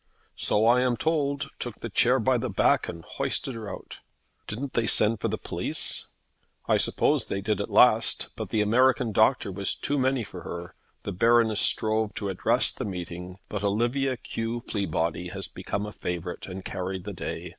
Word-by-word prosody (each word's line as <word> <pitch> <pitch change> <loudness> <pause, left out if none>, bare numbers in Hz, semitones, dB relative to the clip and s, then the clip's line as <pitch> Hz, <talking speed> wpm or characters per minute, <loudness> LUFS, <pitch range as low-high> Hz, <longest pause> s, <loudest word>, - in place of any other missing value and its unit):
"So 105 +1 +3
I 120 +2 +5
am 125 -2 +1
told; 140 -3 -1
took 120 -4 -4
the 115 - -7
chair 125 +5 +4
by 125 +1 +2
the 125 - -3
back 95 - +2
and 85 -1 -8
hoisted 135 - -2
her 110 -3 -7
out." - - -9 0.5
"Didn't 130 +6 -5
they 115 -1 0
send 110 +1 +5
for - - 0
the - - -2
police?" - - -1 0.6
"I - - +3
suppose - - +3
they 100 - -2
did 105 0 -1
at - - -4
last; - - +4
but - - -6
the 110 - +1
American 125 +2 +3
doctor 110 0 +2
was 100 +1 -1
too 145 0 -1
many 130 -1 +1
for 95 -4 -9
her. 85 +1 -7 0.3
The - - -4
Baroness 115 +2 +3
strove 110 -1 +2
to 100 - -3
address 95 - +3
the - - -6
meeting; 90 -1 -6
but 105 -1 -5
Olivia 120 +6 0
Q. 115 +1 -4
Fleabody 90 -5 -2
has 95 -1 -3
become 100 +1 -4
a 105 - -6
favourite, 90 -2 -5
and 95 0 -8
carried 95 0 -4
the 105 +1 -6
day. 90 - -6
110 Hz, 185 wpm, -26 LUFS, 95-120 Hz, 0.6 s, I